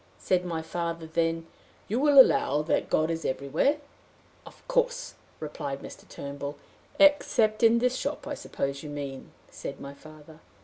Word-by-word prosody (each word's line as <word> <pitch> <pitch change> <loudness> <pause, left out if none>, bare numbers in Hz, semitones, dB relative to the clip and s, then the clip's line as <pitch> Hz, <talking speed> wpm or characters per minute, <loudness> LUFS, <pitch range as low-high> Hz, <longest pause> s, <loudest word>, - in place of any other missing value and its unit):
Said 180 -1 +1
my 165 -3 -3
father 170 0 -3
then, 165 0 -1 0.4
'You 225 +5 0
will 290 -1 +6
allow 150 - +5
that 155 - 0
God 155 +1 +2
is 165 -1 -3
everywhere?' 140 - +1 0.7
'Of - - -16
course,' - - 0 0.3
replied 140 -2 -5
Mr. - - -11
Turnbull. 140 +1 -6 0.4
'Except 235 -7 +4
in 230 0 +6
this 250 +2 +1
shop, 285 +3 -3
I 295 - -4
suppose 140 - -4
you 150 - -8
mean?' 140 -2 -6 0.2
said 140 - -7
my 140 0 -8
father. 155 +1 -15
165 Hz, 150 wpm, -28 LUFS, -, 0.7 s, will